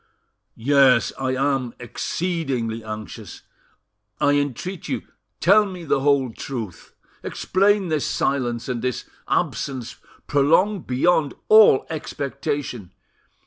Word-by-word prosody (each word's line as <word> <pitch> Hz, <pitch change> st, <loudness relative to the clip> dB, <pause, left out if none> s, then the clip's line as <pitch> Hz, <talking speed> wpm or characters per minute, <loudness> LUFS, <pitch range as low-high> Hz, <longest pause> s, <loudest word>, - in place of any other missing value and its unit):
"Yes, 130 Hz, 0 st, +4 dB
I 130 Hz, -1 st, -1 dB
am 135 Hz, -3 st, 0 dB
exceedingly 125 Hz, -4 st, -3 dB
anxious; 110 Hz, -2 st, -8 dB, 0.8 s
I 145 Hz, -, +3 dB
entreat 145 Hz, +6 st, -2 dB
you, -, -, -2 dB, 0.4 s
tell 205 Hz, +5 st, +5 dB
me 180 Hz, -3 st, -8 dB
the 145 Hz, -, +1 dB
whole 135 Hz, -3 st, +2 dB
truth. 115 Hz, -11 st, -7 dB, 0.3 s
Explain 200 Hz, -1 st, +1 dB
this 155 Hz, -3 st, 0 dB
silence, 120 Hz, -4 st, -1 dB
and 125 Hz, -3 st, -3 dB
this 125 Hz, -1 st, -2 dB, 0.2 s
absence 130 Hz, -3 st, -2 dB, 0.3 s
prolonged 165 Hz, +7 st, +2 dB
beyond 145 Hz, +3 st, +2 dB
all 215 Hz, -11 st, +7 dB
expectation. 140 Hz, -, -4 dB
140 Hz, 100 wpm, -22 LUFS, 120-160 Hz, 0.8 s, all